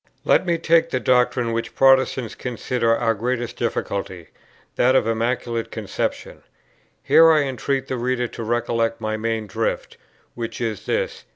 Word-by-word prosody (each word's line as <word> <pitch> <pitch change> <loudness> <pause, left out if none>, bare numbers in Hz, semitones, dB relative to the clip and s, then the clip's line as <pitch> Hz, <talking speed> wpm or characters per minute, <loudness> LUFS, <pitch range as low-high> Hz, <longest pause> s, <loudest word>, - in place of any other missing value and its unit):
Let - - +3
me 170 -1 +2
take 165 0 +3
the 130 - -1
doctrine 125 -1 +2
which 115 0 -3
Protestants 130 -3 +3
consider 120 -1 -1
our 115 -1 +1
greatest 120 +2 -3
difficulty, 100 -6 -4 0.5
that 130 +2 +3
of 130 - +3
the 115 - +1
Immaculate 115 0 -2
Conception. - - -4 0.6
Here 165 0 +6
I 155 -2 +4
entreat 135 0 -2
the 130 - -3
reader 125 0 -1
to 115 - -7
recollect 115 0 -1
my 110 -1 -2
main 110 0 -2
drift, 110 +3 -3 0.4
which 115 -1 -6
is 110 -4 -4
this. - - -2
120 Hz, 155 wpm, -22 LUFS, 115-130 Hz, 0.6 s, Here